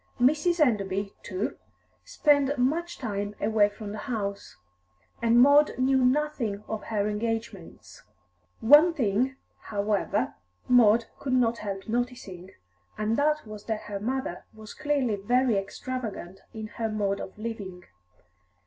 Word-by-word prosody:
Mrs. 305 +7 +3
Enderby, 200 -7 +1
too, 190 +4 -4 0.5
spent 285 -1 +2
much 320 +8 0
time 205 -3 -4
away 215 -2 +3
from 205 0 -8
the 210 - -6
house, 205 - -4 0.6
and 235 +1 +4
Maud 285 +3 +5
knew 260 0 +3
nothing 250 -6 0
of 220 -1 -5
her 210 -2 -1
engagements. 215 -3 -5 0.6
One 295 +8 +7
thing, 250 0 +1 0.3
however, 205 -1 -1 0.3
Maud 230 -2 +5
could 265 -2 -2
not 235 -2 +2
help 195 -2 -5
noticing, 230 -6 -4 0.5
and 215 +1 0
that 300 +1 +1
was 215 -1 -10
that 220 -2 -2
her 205 -1 -6
mother 245 -4 -3
was 215 -1 -10
clearly 280 -8 0
very 245 +4 +2
extravagant 200 -2 -5
in 220 -2 -6 0.2
her 225 - 0
mode 200 -2 -1
of 190 - -8
living. 205 -5 -6
225 Hz, 130 wpm, -27 LUFS, 205-260 Hz, 0.6 s, One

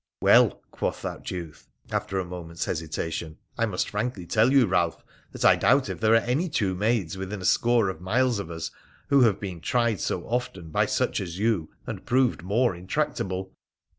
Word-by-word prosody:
'Well,' - - +5
quoth - - -3
that - - -5
youth, 85 -4 -7 0.2
after 95 - -2
a 95 - -1
moment's 85 -1 -5
hesitation, 80 -1 -4
' - - -38
I 115 - +2
must 90 -4 -1
frankly 105 -3 -3
tell 110 +8 +3
you, 135 -3 +6
Balph, 90 -4 0 0.3
that - - -3
I - - +8
doubt 135 +2 +3
if - - -4
there 110 0 +3
are 115 - +3
any 145 +9 0
two 100 -10 0
maids 95 -3 0
within 95 +2 -4
a 90 - -6
score 120 -1 +3
of 95 -3 -4
miles 120 +4 +1
of 100 - -5
us 80 -1 -5 0.4
who 140 -1 +5
have 110 -6 +4
been 90 -5 -6
tried 120 -2 +1
so 85 - -2
often 105 -9 -3
by - - +2
such - - 0
as 90 -2 -5
you 105 -6 0 0.2
and - - -6
proved 125 -4 +2
more 105 +4 +1
intractable. 95 - -2
95 Hz, 195 wpm, -26 LUFS, 90-120 Hz, 0.4 s, I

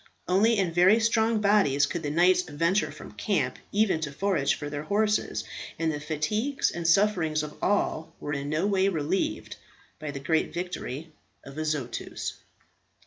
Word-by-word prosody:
Only 215 +5 +3
in 185 -4 0
very 185 +6 +5
strong 225 -1 +2
bodies 195 -9 +4
could 170 +4 -4
the 150 - -3
knights 180 +4 +4
venture 170 +5 0
from - - -11
camp - - -1
even 205 -5 +2
to 155 -2 -3
forage 165 -2 +1
for 145 - -6
their 145 0 -4
horses, 210 +6 0 0.3
and 165 -1 0
the 150 - -4
fatigues 170 - -1
and 170 -1 -3
sufferings 170 -5 +3
of 150 0 -7
all 195 -5 0
were 145 - -4
in 140 0 -3
a 155 +5 +1
way 195 -1 +2
relieved 190 - -2 0.4
by 155 -1 -5
the 140 -1 -5
great 160 +4 0
victory 165 -4 -5 0.3
of 140 - -10
Azotus. 150 -6 -3
170 Hz, 160 wpm, -27 LUFS, 150-200 Hz, 0.4 s, very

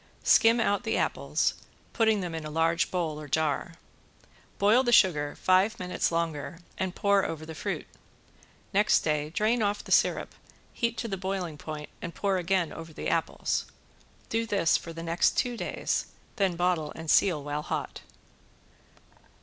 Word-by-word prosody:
Skim 230 +1 +5
out 205 -3 +1
the - - -1
apples, - - 0 0.4
putting 220 -3 +2
them 175 -2 -4
in 160 -1 -4
a 155 - -5
large 165 +2 +1
bowl 160 -4 -2
or 150 - -8
jar. 160 +2 -1 0.8
Boil 210 +5 +5
the 240 -2 0
sugar 155 -10 +4
five 190 +4 +3
minutes 180 -1 -1
longer 165 -1 -2 0.2
and 190 -1 -3
pour 200 -1 +3
over 155 -1 -4
the 160 - -7
fruit. 145 - -4 0.9
Next 205 +2 +4
day 150 -1 -1
drain 220 +6 +1
off 205 0 0
the - - -10
syrup, - - +2 0.4
heat 235 0 -1
to 230 - -3
the 195 -3 -3
boiling 185 -4 -3
point 150 0 -7
and 170 - -6
pour 195 -2 0
again 180 -1 0
over 165 0 -9
the - - -4
apples. - - -1 0.6
Do 225 0 -1
this 200 -6 +2
for 165 - -3
the 165 0 -7
next 170 +1 +1
two 245 -1 +1
days, - - -2 0.3
then 195 -3 +1
bottle 175 -3 0
and 160 0 -8
seal 170 -7 +3
while 145 +1 -3
hot. - - -4
175 Hz, 165 wpm, -28 LUFS, 160-200 Hz, 0.9 s, Skim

